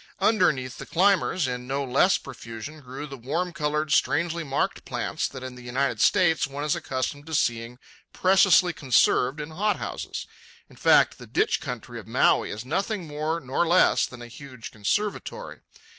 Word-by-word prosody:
Underneath 180 - +1
the - - -8
climbers, 185 -3 +2
in 125 0 -4
no 140 +1 -1
less 140 +8 +3
profusion, 125 +3 -9
grew 135 +2 -7
the 140 -2 -9
warm 165 +9 -3
coloured, 150 -1 -1
strangely 170 +2 +1
marked 140 -2 -2
plants - - -2
that 130 -2 -9
in 130 -1 -6
the 125 - -12
United 125 -1 -1
States 165 -8 +3
one 140 +1 -6
is 150 - +1
accustomed 145 +3 -4
to 160 - -3
seeing 115 -1 -1 0.3
preciously 185 -1 +4
conserved 130 -1 +2
in 150 +1 -6
hot 205 +5 0
houses. - - -5 0.4
In - - -18
fact, - - +4
the - - -11
ditch - - +1
country - - -6
of - - -13
Maui - - +3
is 110 +4 -6
nothing 195 - -2
more 155 +2 -2
nor 135 +4 -1
less 175 +2 +4
than 120 -1 -11
a - - -9
huge 130 -1 -10
conservatory. 205 - -3
145 Hz, 170 wpm, -25 LUFS, 130-175 Hz, 0.4 s, preciously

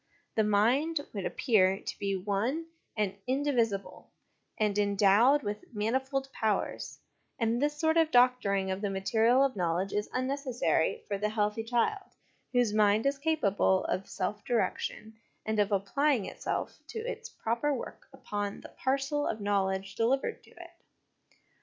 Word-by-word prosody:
The 220 - +2
mind 245 +10 +2
would 200 -3 -2
appear 195 -6 +2
to - - -7
be 200 -1 -1
one 210 - -1 0.3
and 205 -3 0
indivisible, 250 -7 -1 0.5
and 210 -3 +1
endowed 205 +7 +4
with 205 +1 -4
manifold 265 +5 -1
powers; 215 -3 -2 0.4
and 230 +1 0
this 295 +1 0
sort 320 +1 +2
of 325 -1 +4
doctoring 245 -7 +3
of 190 +1 -3
the 205 - -1
material 225 +6 +3
of 275 -3 +1
knowledge 180 +1 -1
is 210 0 -1
Unnecessary 255 - 0
for 200 -1 -2
the 210 +1 0
healthy 210 +1 -1
child, 245 - -1 0.4
whose 245 -4 +2
mind 210 +1 +3
is 275 0 +1
capable 210 -11 +2
of 190 - -2
self 205 +2 -3
direction, 225 -2 -2 0.3
and 220 0 -1
ot 205 0 +2
applying 225 +4 +1
itself - - -4
to - - -7
its 465 0 -5
proper 235 - -1
work 265 - -6
upon 205 -1 -4
the - - -11
parcel 275 +2 -1
of 225 - -2
knowledge 195 -1 0
delivered 250 +6 0
to - - -19
it. 345 -1 -13
220 Hz, 145 wpm, -30 LUFS, 200-270 Hz, 0.5 s, endowed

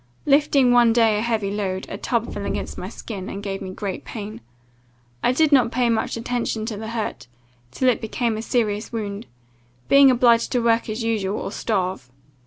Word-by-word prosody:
Lifting 280 -3 +4
one 240 -2 +5
day 225 -3 +3
a - - -1
heavy 220 -4 -1
load, 190 -2 -3
a - - -6
tub 235 +3 -2
fell 205 - -5
against - - -4
my 185 - -6
shin, 200 -4 -7
and 200 - -6
gave 195 -1 -4
me 190 - -5
great 190 +1 -5
pain. 210 - -7 0.8
I 245 - +3
did 310 +4 +2
not 255 -4 +4
pay 245 -1 +1
much 225 0 -1
attention 230 -2 -2
to 220 -1 -4
the 220 +1 -6
hurt, 225 - -4 0.4
till 260 - -1
it 250 - +3
became 225 +1 -1
a 215 - -4
serious 220 -3 -1
wound; 205 - -5 0.6
being 275 -1 +7
obliged 240 -2 +4
to 250 - +2
work 230 -1 +2
as 215 +2 -3
usual, 210 -3 -1
or - - -5
starve. 185 - -2
225 Hz, 195 wpm, -22 LUFS, 205-240 Hz, 0.8 s, being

